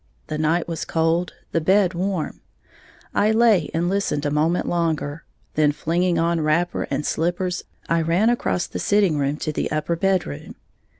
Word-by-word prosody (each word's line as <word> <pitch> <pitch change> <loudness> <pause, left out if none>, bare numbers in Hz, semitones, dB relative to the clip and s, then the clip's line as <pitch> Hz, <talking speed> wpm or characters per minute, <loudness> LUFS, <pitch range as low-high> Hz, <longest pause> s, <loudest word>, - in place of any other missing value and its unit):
The 155 0 -3
night 160 +2 +1
was 165 -2 -3
cold, 165 +1 0 0.2
the 165 - +1
bed 190 +2 +3
warm; 180 -2 -2 0.7
I 210 - +3
lay 220 -7 +4
and 165 +2 0
listened 190 -6 -1
a 145 - 0
moment 160 +4 +1
longer. 160 -3 -1 0.3
Then 150 -1 +3
flinging 170 +3 0
on 165 0 +1
wrapper 155 +3 0
and 140 +2 -2
slippers, 175 +2 -1 0.2
I 165 0 +2
ran 175 +8 +3
across 210 -7 0
the - - -6
sitting 200 -7 +2
room 140 +1 0
to 155 - -3
the - - -2
upper 155 +2 -1
bedroom. 185 - -1
170 Hz, 165 wpm, -22 LUFS, 155-180 Hz, 0.7 s, lay